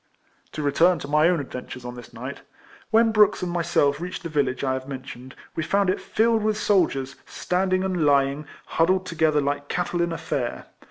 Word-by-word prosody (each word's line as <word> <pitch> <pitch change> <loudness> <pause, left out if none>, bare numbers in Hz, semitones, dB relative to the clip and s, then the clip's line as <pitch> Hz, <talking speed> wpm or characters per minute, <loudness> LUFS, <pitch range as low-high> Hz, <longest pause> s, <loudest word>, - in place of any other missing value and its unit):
To 150 - -4
return 170 +5 +3
to 145 - -7
my 150 +3 +4
own 180 -2 +1
adventures 125 -2 -7
on 125 - -5
this 120 -1 -11
night. 125 +4 -7 0.5
AVhen 225 0 +4
Brooks 210 -3 +4
and 175 - -2
myself 170 -4 +1
reached 180 +1 -5
the 170 - -4
village 140 -4 0
I 130 -1 +1
have 130 0 -5
mentioned, 130 -1 -8 0.2
we 165 - -1
found 195 +3 +2
it - - -3
filled 225 0 +1
with 215 0 0
soldiers, 140 -11 +1
standing 185 +1 0
and 185 -4 0
lying, 140 0 +2 0.2
huddled 185 +3 +1
together 160 -4 +1
like 145 0 -2
cattle 175 +1 -1
in 170 0 0
a 165 - -3
fair. 125 -5 -3
160 Hz, 195 wpm, -24 LUFS, 140-185 Hz, 0.5 s, my